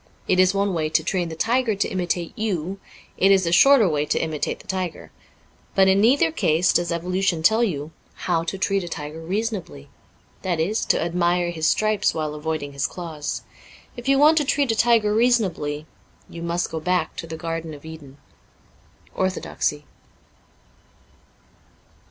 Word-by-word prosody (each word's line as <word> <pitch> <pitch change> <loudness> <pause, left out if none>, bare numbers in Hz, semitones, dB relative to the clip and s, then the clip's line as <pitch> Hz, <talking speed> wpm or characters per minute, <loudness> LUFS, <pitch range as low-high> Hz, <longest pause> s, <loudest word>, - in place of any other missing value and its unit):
It 185 - +2
is 185 0 +5
one 200 -1 +1
way 155 -2 -1
to 160 +1 +1
train 175 0 -1
the 160 - -6
tiger 230 +4 +1
to 200 - 0
imitate 175 -2 -2
you; 195 -3 -3 0.4
it 195 - +4
is 190 -2 +4
a 170 - 0
shorter 260 +4 +6
way 150 -2 0
to - - 0
imitate 155 -2 -2
the - - -16
tiger. 185 -3 -4 0.6
But 190 -1 +5
in 190 +1 +4
neither 230 - +4
case 165 0 +2
does 175 0 +1
evolution 180 0 -1
tell 220 +6 +4
you 155 -8 -2 0.3
hov/ 170 -2 0
to 195 - -3
treat 195 0 0
a - - -6
tiger 150 0 -6
reasonably 195 - -4 0.3
— - - -35
that 175 -3 -1
is, 200 +8 0
to - - +3
admire 175 +1 0
his 160 -2 -1
stripes 215 -1 +1
while 155 -2 -2
avoiding 150 -1 -4
his 140 -1 -1
claws. 160 -4 -5 0.5
If 240 +1 -9
you 275 - +5
want 305 +3 +6
to - - +1
treat 280 -2 +1
a - - 0
tiger 225 -2 +3
reasonably, 195 -11 +1 0.4
you 170 - -9
must 170 +1 -2
go 160 - -3
back 180 0 -1
to 165 - -6
the 160 0 -6
garden 165 -1 -5
of 145 - -15
Eden. 150 -4 -11 0.5
' - - -32
Orthodoxy.'' 185 -5 -2
175 Hz, 175 wpm, -23 LUFS, 160-200 Hz, 0.6 s, shorter